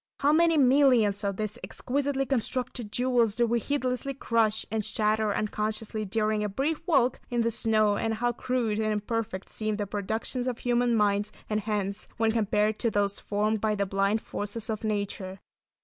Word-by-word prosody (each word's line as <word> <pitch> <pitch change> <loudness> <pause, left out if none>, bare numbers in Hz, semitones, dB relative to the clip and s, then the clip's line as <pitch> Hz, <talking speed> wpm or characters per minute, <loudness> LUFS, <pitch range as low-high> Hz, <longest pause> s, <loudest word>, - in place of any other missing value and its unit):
How 285 +2 +4
many 330 0 +4
millions 250 -7 +4
of 200 -1 -1
these 215 +2 -3
exquisitely 270 +1 -1
constructed 250 -3 -2
jewels 245 -3 +2
do 240 - +3
we 235 +1 +1
heedlessly 270 +1 -2
crush 225 -4 +1
and 220 -1 -1
shatter 215 0 +1
unconsciously 215 +1 -2
during 215 +1 0
a 210 - -1
brief 280 +10 -1
walk 260 -7 +3
in 240 -1 0
the 230 0 +1
snow 215 -2 +2
and 225 +1 -1
how 240 +2 0
crude 235 -3 -1
and 215 0 0
imperfect 210 -2 -3
seem 215 -1 -2
the 205 -1 -2
productions 220 +5 -2
of 250 -2 -2
human 245 -1 +1
minds 205 -1 +2 0.2
and 210 - +2
hands 205 -1 -2
when 225 0 +2
compared 215 -1 +1
to 230 - +1
those 200 -1 0
formed 210 +1 -1
by 215 -1 +1
the 200 -1 0
blind 195 +3 0
forces 210 +2 -4
of 215 0 -4
nature. 200 -3 -3
220 Hz, 175 wpm, -28 LUFS, 210-245 Hz, 0.2 s, How